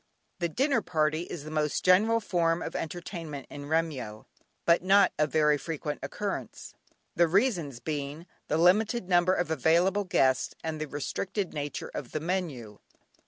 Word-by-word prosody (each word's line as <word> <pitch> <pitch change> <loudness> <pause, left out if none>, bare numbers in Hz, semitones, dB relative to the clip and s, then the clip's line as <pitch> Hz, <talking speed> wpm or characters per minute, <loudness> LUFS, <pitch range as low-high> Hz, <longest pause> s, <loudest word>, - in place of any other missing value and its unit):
The 170 -1 0
dinner 270 - +1
party 155 0 0
is 160 - -6
the 155 - -8
most 150 -1 -1
general 215 +5 +5
form 170 -5 0
of - - -6
entertainment 165 -4 -5
in 145 0 -7
Remyo, 145 -9 -2 0.4
but 170 0 +4
not 195 +2 +5
of 150 -1 +2
very 150 -2 +3
frequent 150 -2 -4
occurrence; - - -5 0.4
the 170 0 +4
reasons 175 - +1
being, 150 +2 -4 0.2
the 155 - +1
limited 205 +5 +3
number 180 0 +4
of 175 -2 -1
available 170 +7 +2
guests 130 -7 +2
and 155 -1 -3
the 155 - -2
restricted 180 +7 -3
nature 145 -1 -4
of 125 - -6
the 155 - -1
menu. 150 - -3
165 Hz, 155 wpm, -28 LUFS, 150-185 Hz, 0.4 s, general